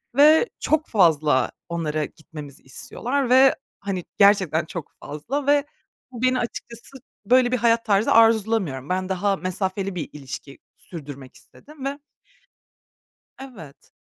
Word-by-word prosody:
ve 310 Hz, -, +6 dB
çok 310 Hz, 0 st, 0 dB
fazla 155 Hz, -, +3 dB, 0.2 s
onlara 155 Hz, -3 st, -2 dB
gitmemizi 150 Hz, -3 st, -12 dB
istiyorlar 245 Hz, -, -3 dB
ve, 260 Hz, +1 st, +6 dB, 0.2 s
hani, 195 Hz, -3 st, -4 dB
gerçekten 190 Hz, -6 st, +4 dB
çok 165 Hz, -1 st, -7 dB
fazla 265 Hz, -, -4 dB
ve 290 Hz, 0 st, +3 dB, 0.5 s
bu 240 Hz, -2 st, -8 dB
beni 255 Hz, 0 st, +2 dB
açıkçası 235 Hz, +2 st, -7 dB, 0.3 s
böyle 250 Hz, +2 st, +4 dB
bir 255 Hz, -, +2 dB
hayat 230 Hz, 0 st, +2 dB
tarzı 205 Hz, 0 st, +2 dB
arzulamıyorum. 220 Hz, -, +2 dB
Ben 185 Hz, +1 st, -1 dB
daha 195 Hz, +1 st, 0 dB
mesafeli 190 Hz, +1 st, -3 dB
bir 170 Hz, -, -4 dB
ilişki 140 Hz, -1 st, -9 dB, 0.2 s
sürdürmek 140 Hz, -6 st, -10 dB
istedim 295 Hz, -2 st, -14 dB
ve 280 Hz, +1 st, -3 dB, 1.4 s
Evet. 215 Hz, -, -12 dB
200 Hz, 125 wpm, -23 LUFS, 155-250 Hz, 1.4 s, ve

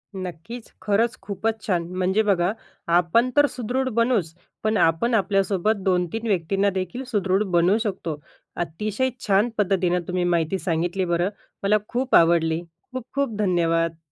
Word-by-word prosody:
नक्कीच. 185 Hz, +6 st, -7 dB
खरंच 220 Hz, +3 st, +1 dB
खूपच 215 Hz, +2 st, -3 dB
छान! 175 Hz, -4 st, +1 dB
म्हणजे 190 Hz, +3 st, +2 dB
बघा, 190 Hz, -3 st, +2 dB, 0.4 s
आपण 175 Hz, +8 st, +3 dB
तर 290 Hz, -, +7 dB
सुदृढ 260 Hz, +1 st, -2 dB
बनूच 225 Hz, -9 st, +1 dB, 0.3 s
पण 215 Hz, 0 st, +1 dB
आपण 165 Hz, +10 st, +2 dB
आपल्यासोबत 195 Hz, 0 st, +2 dB
2-3 185 Hz, +4 st, 0 dB
व्यक्तींना 195 Hz, +1 st, +1 dB
देखील 190 Hz, +6 st, -4 dB
सुदृढ 195 Hz, -3 st, +1 dB
बनवू 180 Hz, +5 st, +4 dB
शकतो. 170 Hz, -8 st, -4 dB, 0.4 s
अतिशय 210 Hz, +9 st, -2 dB, 0.2 s
छान 205 Hz, +3 st, +3 dB
पद्धतीने 185 Hz, -3 st, +1 dB
तुम्ही 180 Hz, 0 st, -1 dB
माहिती 175 Hz, +1 st, +1 dB
सांगितली 175 Hz, +3 st, -1 dB
बरं. 175 Hz, +1 st, +1 dB, 0.3 s
मला 205 Hz, +2 st, +4 dB
खूप 255 Hz, +2 st, 0 dB
आवडली. 165 Hz, -1 st, +4 dB, 0.3 s
खूप 255 Hz, -1 st, -5 dB
खूप 275 Hz, -6 st, -1 dB
धन्यवाद. 165 Hz, -4 st, +1 dB
195 Hz, 135 wpm, -23 LUFS, 175-220 Hz, 0.4 s, तर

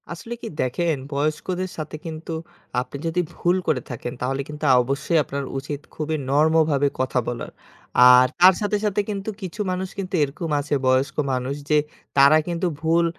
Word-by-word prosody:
আসলে 200 Hz, +8 st, -6 dB
কি -, -, -5 dB
দেখেন, 160 Hz, +6 st, 0 dB, 0.2 s
বয়স্কদের 155 Hz, +6 st, -1 dB
সাথে 155 Hz, -1 st, -5 dB
কিন্তু 160 Hz, 0 st, -6 dB, 0.5 s
আপনি 125 Hz, +2 st, -7 dB
যদি 165 Hz, +2 st, +1 dB
ভুল 175 Hz, +1 st, +1 dB
করে 130 Hz, -, +1 dB
থাকেন, 120 Hz, 0 st, -5 dB
তাহলে 135 Hz, +2 st, -1 dB
কিন্তু 150 Hz, +1 st, -9 dB
আ -, -, +7 dB
অবশ্যই 140 Hz, +6 st, 0 dB
আপনার 140 Hz, 0 st, -4 dB
উচিত 140 Hz, +1 st, -4 dB, 0.2 s
খুবই 155 Hz, 0 st, -2 dB
নরমভাবে 150 Hz, 0 st, +3 dB
কথা 130 Hz, -1 st, +1 dB
বলার। 120 Hz, -1 st, -4 dB, 0.6 s
আর 125 Hz, 0 st, +7 dB
তার 185 Hz, +1 st, +9 dB
সাথে, 210 Hz, 0 st, +1 dB
সাথে 205 Hz, 0 st, +1 dB
কিন্তু 200 Hz, 0 st, -3 dB
কিছু 190 Hz, +3 st, -5 dB
মানুষ 185 Hz, +1 st, -3 dB
কিন্তু 190 Hz, -1 st, -5 dB
এরকম 145 Hz, +4 st, -4 dB
আছে 145 Hz, +1 st, -1 dB
বয়স্ক 130 Hz, +2 st, +2 dB, 0.2 s
মানুষ, 130 Hz, +2 st, -2 dB
যে 150 Hz, -, +4 dB, 0.4 s
তারা 140 Hz, +3 st, +7 dB
কিন্তু 175 Hz, +1 st, -1 dB
ভুল 165 Hz, +1 st, +3 dB
155 Hz, 170 wpm, -23 LUFS, 140-175 Hz, 0.6 s, তার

